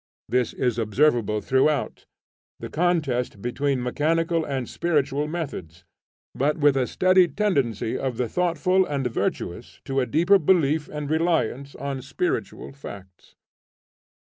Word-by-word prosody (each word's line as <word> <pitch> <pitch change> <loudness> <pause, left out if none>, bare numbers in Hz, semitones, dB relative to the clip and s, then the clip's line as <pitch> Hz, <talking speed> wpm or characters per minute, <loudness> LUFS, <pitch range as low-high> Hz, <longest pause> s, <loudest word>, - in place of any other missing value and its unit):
There 125 - +2 0.2
is 120 -3 0
observable 115 -2 +2
throughout, 135 +3 0 0.5
the - - -7
contest 150 - 0
between 130 +3 -1
mechanical 165 +5 0
and 135 -5 -3
spiritual 150 -3 0
methods, 130 - -6 0.5
but 145 +4 0
with 145 -3 +4
a 130 -2 +1
steady 185 -1 +4
tendency 140 - -1
of 130 -3 -3
the 125 -1 0
thoughtful 180 - +1
and 140 -6 -3
virtuous 120 - -3
to 135 0 -1
a 125 - 0
deeper 175 - +4
belief 155 -3 +2
and 150 -1 -5
reliance 155 -4 0
on 140 -1 -4
spiritual 135 +5 -3
facts. 95 -9 -12
140 Hz, 125 wpm, -24 LUFS, 125-165 Hz, 0.5 s, with